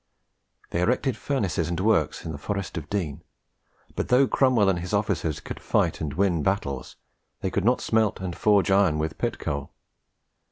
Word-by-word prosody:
They 85 - 0
erected 125 +5 +1
furnaces 100 - -1
and 85 - -2
works 100 -6 +1
in 80 - -3
the 70 - -7
Forest 100 +3 -4
of 80 -2 -5
Dean; 85 -7 -2 0.7
but, - - -2
though 125 +2 +5
Cromwell 125 -7 +3
and 95 -3 +2
his 90 +3 -6
officers 95 -7 0
could - - -7
fight - - 0
and 75 -2 -3
win 90 -4 +2
battles, 70 -7 -2 0.5
they 95 - -1
could 100 - 0
not 125 +2 +3
smelt 110 -2 +1
and 90 -2 -4
forge 100 -2 +3
iron 95 -5 +4
with 80 +1 -3
pit - - -1
coal. 70 -1 -4
95 Hz, 175 wpm, -25 LUFS, 80-105 Hz, 0.7 s, though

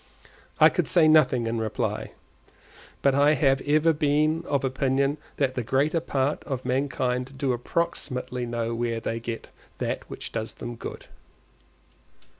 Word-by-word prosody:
I - - +8
could - - -1
say 170 -3 +5
nothing 130 -6 +4
in 115 0 -1
reply, 110 -1 -2 0.9
but 140 - +4
I 145 +2 +4
have 135 -3 +2
ever 155 +3 +3
been 155 +2 +1
of 140 -2 0
opinion 135 +2 +1 0.2
that 135 -3 0
the 125 - -2
greater 140 +8 +1
part 145 -3 -1
of 130 -3 -4
mankind 130 0 -1
do 135 -2 0
approximately 125 -2 -2
know 115 -1 -2
where 115 0 -1
they 115 0 -3
get 115 0 -6 0.3
that - - -3
which - - -7
does 115 0 -4
them 120 0 -6
good. - - -8
135 Hz, 145 wpm, -26 LUFS, 120-145 Hz, 0.9 s, I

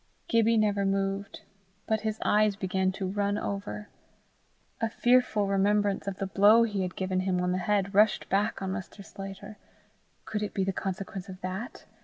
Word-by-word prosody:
Gibbie 230 0 +3
never 205 -2 +2
moved, 195 0 -1 0.4
but 220 -1 0
his 220 -1 -2
eyes 210 -1 +3
began 190 -1 0
to 195 0 -4
run 200 +2 0
over. 200 +1 -4 0.9
A 225 - +1
fearful 240 -3 +3
remembrance 200 +1 +1
of 195 -1 -3
the 195 - -2
blow 205 +4 +5
he 205 -4 -1
had 180 -1 -3
given 185 -1 -1
him 185 -1 0
on 180 0 0
the 185 - 0
head 200 0 0
rushed 210 +2 +4
back 200 +1 0
on 190 - -2
Mr. 195 +1 -7
Sclater: 195 +2 -9 0.7
could 210 - -3
it 210 - -4
be 195 - +1
the 195 0 -1
consequence 190 0 -5
of 185 0 -9
that? 190 +6 -6
200 Hz, 175 wpm, -28 LUFS, 190-210 Hz, 0.9 s, blow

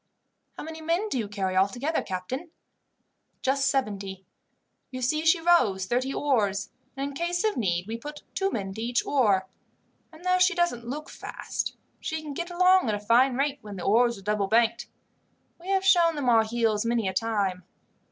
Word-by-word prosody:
"How - - -6
many 320 +1 -8
men 340 +7 0
do 260 - -1
you 215 - -2
carry 195 -2 -2
altogether, 245 - +1
captain?" 230 - -5 0.9
"Just 270 +1 +2
seventy. 200 -8 -2 0.6
You 255 - -6
see 305 +5 +1
she 330 +1 +5
rows 245 - +3
thirty 250 +6 0
oars, 210 -10 0 0.3
and 275 +1 -2
in - - -9
case 345 +4 -1
of 435 -1 +1
need 180 -7 0
we 225 +2 -4
put 295 +5 -9
two 390 0 0
men 195 - -4
to 220 - -6
each 240 +1 0
oar, 205 -9 +2 0.7
and 325 +2 -15
though 365 0 +3
she 375 +1 +4
doesn't 345 -10 0
look 295 +5 -5
fast - - -5 0.2
she 315 - -3
can 295 -2 -6
get 345 +5 -4
along 365 -4 +4
at 210 - +1
a - - -4
fine 240 +5 +3
rate 280 +1 0
when 205 -1 -9
the 180 - -6
oars 235 +2 +3
are 195 - -13
double 210 -1 0
banked. 230 +2 +2 0.7
We 350 - -13
have 385 0 +1
shown 345 -4 +5
them 280 -4 0
our 225 -2 +5
heels 220 -2 0
many 230 -3 0
a 190 - -1
time. 200 -4 -1
245 Hz, 190 wpm, -27 LUFS, 210-320 Hz, 0.9 s, she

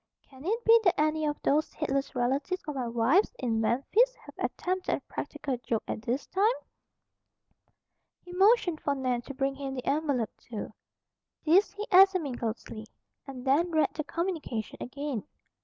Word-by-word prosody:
"Can 265 0 -15
it 455 +5 -1
be 460 +1 +8
that 360 -6 +3
any 310 0 +1
of 295 - -2
those 300 +2 +1
heedless 275 -3 -2
relatives 275 +8 0
of 300 - -2
my 255 -3 -3
wife's 240 - +2
in 230 -4 0
Memphis 405 - +2
have - - -14
attempted 370 0 -1
a - - -6
practical 265 -3 -4
joke 225 -2 -2
at - - -4
this 250 +4 -2
time?" 410 +5 +2 1.7
He 355 - -11
motioned 380 -4 +4
for 285 - 0
Nan 255 -3 -1
to 275 +3 -9
bring 270 0 0
him 270 -1 -5
the 255 - -5
envelope, 280 -7 0
too. 215 -2 -7 0.7
This 365 +7 +4
he 415 +1 -5
examined 370 -9 +5
closely, 220 -1 -5 0.4
and 260 -2 -8
then 295 +7 +3
read 315 -2 +2
the 305 - -3
communication 325 - -3
again. 275 -3 -4
285 Hz, 160 wpm, -29 LUFS, 250-360 Hz, 1.7 s, be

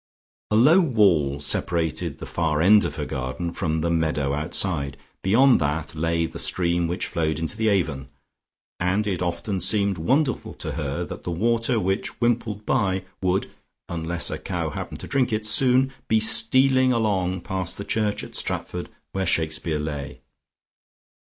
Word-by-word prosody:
A 105 - +1
low 150 - +6
wall 95 - +3
separated 80 +3 -1
the - - -8
far 80 -3 -1
end 105 +5 +6
of - - -4
her - - -3
garden 70 +7 -4
from 80 -3 -1
the 85 +1 0
meadow 80 -4 0
outside; 75 -2 -1 0.2
beyond 125 +7 +5
that 75 +2 -2
lay 80 +1 0
the - - -5
stream 85 -1 +2
which 90 +3 -2
flowed 80 -3 -1
into 80 +3 -3
the 110 0 0
Avon, 85 -10 0 0.7
and 95 +4 +1
it 95 -4 -2
often 90 +2 -2
seemed 100 -4 +2
wonderful 130 - 0
to - - -4
her - - -3
that - - -8
the - - -4
water 115 +6 +1
which 95 0 -2
wimpled 115 -3 -1
by 95 -6 0 0.2
would 95 0 0 0.4
(unless 85 0 -1
a - - -4
cow - - -3
happened - - -6
to - - -7
drink 135 -4 +1
it) 110 0 -1
soon 130 +4 +4
be 110 - +3
stealing 130 +4 +4
along 95 -6 0
past 95 -1 -3
the 100 - -6
church 105 -2 -1
at - - -10
Stratford - - -4 0.2
where 95 -1 -2
Shakespeare 80 -1 0
lay. 75 -3 -5
90 Hz, 160 wpm, -24 LUFS, 80-110 Hz, 0.7 s, low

